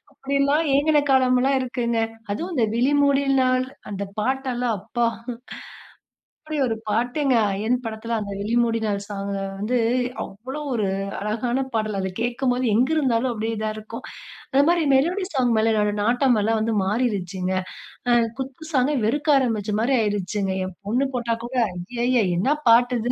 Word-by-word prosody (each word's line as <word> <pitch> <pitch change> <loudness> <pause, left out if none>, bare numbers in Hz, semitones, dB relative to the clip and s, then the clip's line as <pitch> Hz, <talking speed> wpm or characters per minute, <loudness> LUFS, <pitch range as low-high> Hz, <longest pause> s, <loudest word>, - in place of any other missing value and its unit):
அப்டியெல்லாம் 280 +3 +1
ஏங்குன 295 +2 +4
காலமெல்லாம் 260 +1 +3
இருக்குங்க. 240 -2 -1 0.3
அதுவும் 340 - -3
இந்த 240 -5 +2
விழிமூடில் 280 +2 +3
நாள், 255 0 +2 0.2
அந்த 200 0 -3
பாட்டு 265 +4 -1
எல்லாம் 240 -2 0
அப்பா! 235 +5 -1 1.4
அப்டி 310 -1 -3
ஒரு 225 -2 -1
பாட்டுங்க, 245 +5 +1 0.2
அயன் 220 +6 0
படத்தில 225 +1 -3
அந்த 200 -1 -5
விழிமூடினால் 225 -2 0
சாங் 200 -1 -4
அ - - -2 0.2
வந்து, 240 +4 0 0.5
அவ்வளவு 265 +8 -7
ஒரு 210 -4 0 0.3
அழகான 235 +5 -1
பாடல். 215 -2 -1
அதை 190 0 -2
கேட்கும்போது 245 +1 0
எங்கு 255 +7 +3
இருந்தாலும் 255 -3 +1
அப்டியே 225 0 -2
இதா 215 0 -2
இருக்கும். 220 +3 -8 0.5
அத 275 +1 +5
மாரி 340 -2 +3
மெலோடி 355 +8 +2
சாங் 245 -3 +2
மேல 225 +1 +3
என்னோட 210 -1 +1
நாட்டமெல்லாம் 225 -3 +2
வந்து 225 0 0
மாறிருச்சுங்க. 190 -4 -1 0.6
ஆ - - +4 0.3
குத்து 270 +5 -6
சாங்க 270 +3 +2
வெறுக்க 290 +5 +2
ஆரம்பிச்ச 220 -5 0
மாரி 260 +3 +2
ஆயிருச்சுங்க. 205 -1 -1
என் 185 -1 -8
பொண்ணு 255 +5 +1
போட்டா 235 -1 0
கூட, 255 - -7 0.2
ஐய்யய்ய! 240 +6 0 0.2
என்ன 275 +11 +2
பாட்டு 245 +2 +5
இது! 245 - 0
240 Hz, 150 wpm, -23 LUFS, 215-265 Hz, 1.4 s, அத